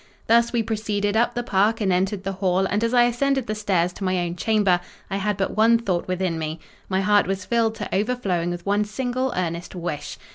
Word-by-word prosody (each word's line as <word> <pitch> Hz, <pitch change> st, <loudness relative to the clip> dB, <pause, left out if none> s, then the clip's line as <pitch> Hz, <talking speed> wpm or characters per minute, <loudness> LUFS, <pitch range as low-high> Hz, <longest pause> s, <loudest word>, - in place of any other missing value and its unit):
Thus 235 Hz, +1 st, +4 dB
we 235 Hz, -2 st, +1 dB
proceeded 210 Hz, -2 st, -1 dB
up 240 Hz, +2 st, +2 dB
the 240 Hz, -, -1 dB
park, 210 Hz, +1 st, +2 dB
and 195 Hz, -4 st, +1 dB
entered 190 Hz, +2 st, 0 dB
the 195 Hz, -, -2 dB
hall; 190 Hz, 0 st, +1 dB
and 205 Hz, +3 st, 0 dB
as 230 Hz, -, +1 dB
I 245 Hz, -1 st, +5 dB
ascended 265 Hz, +2 st, +1 dB
the 215 Hz, -, -2 dB
stairs 190 Hz, -5 st, 0 dB
to 195 Hz, -, -8 dB
my 185 Hz, -1 st, +1 dB
own 175 Hz, 0 st, -3 dB
chamber, 200 Hz, -2 st, +2 dB, 0.3 s
I 195 Hz, -, 0 dB
had 200 Hz, 0 st, -1 dB
but 195 Hz, -, -1 dB
one 225 Hz, +2 st, +5 dB
thought 190 Hz, -7 st, -2 dB
within 185 Hz, -2 st, -1 dB
me: 155 Hz, +1 st, -4 dB, 0.3 s
my 190 Hz, 0 st, +1 dB
heart 205 Hz, -1 st, +3 dB
was 190 Hz, 0 st, -2 dB
filled 230 Hz, 0 st, +1 dB
to -, -, -4 dB
overflowing 195 Hz, -5 st, 0 dB
with 175 Hz, 0 st, -5 dB
one 205 Hz, +1 st, +2 dB
single 255 Hz, +4 st, -2 dB
earnest 170 Hz, 0 st, -3 dB
wish. 170 Hz, -4 st, -5 dB
205 Hz, 220 wpm, -23 LUFS, 185-230 Hz, 0.3 s, I